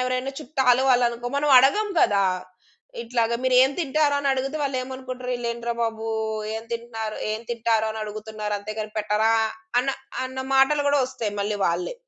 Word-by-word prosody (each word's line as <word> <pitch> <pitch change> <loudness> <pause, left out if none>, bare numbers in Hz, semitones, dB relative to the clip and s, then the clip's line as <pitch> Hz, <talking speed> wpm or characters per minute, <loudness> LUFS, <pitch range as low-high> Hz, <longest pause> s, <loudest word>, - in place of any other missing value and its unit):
ఎవరైనా 255 +1 -1
చుట్టాలు 265 -4 +2
వాళ్ళు 250 -1 +5
అనుకో 235 +1 -6
మనం 295 +1 +1
అడగం 410 +12 +3
కదా! 200 -3 +4 0.8
ఇట్లాగ 235 -1 0
మీరు 260 -1 +2
ఏం 265 - +4
తింటారని 285 -2 +1
అడిగితే, 270 +3 -2
వాళ్లేమనుకుంటారు, 255 -2 -4
"వీళ్లేంట్రా 235 -1 -2
బాబు! 225 -1 -2 0.5
ఏం 225 - -4
తింటున్నారు 225 -2 -4 0.2
ఏం 215 - -3
తింటారు 225 -2 +1
అని 220 0 -5
అడుగుతున్నారు. 215 0 -5
అంతేగాని 215 +1 -6
పెట్టరా" 215 +1 +2 0.5
అన్న 265 - -4 0.4
అన్న 260 0 -6
మాటలు 285 +2 +4
కూడా 285 0 +3
వస్తాయి 250 -5 -4
మళ్ళీ 205 +1 -1
వాళ్ళే. 170 - -1
240 Hz, 150 wpm, -24 LUFS, 220-265 Hz, 0.8 s, వాళ్ళు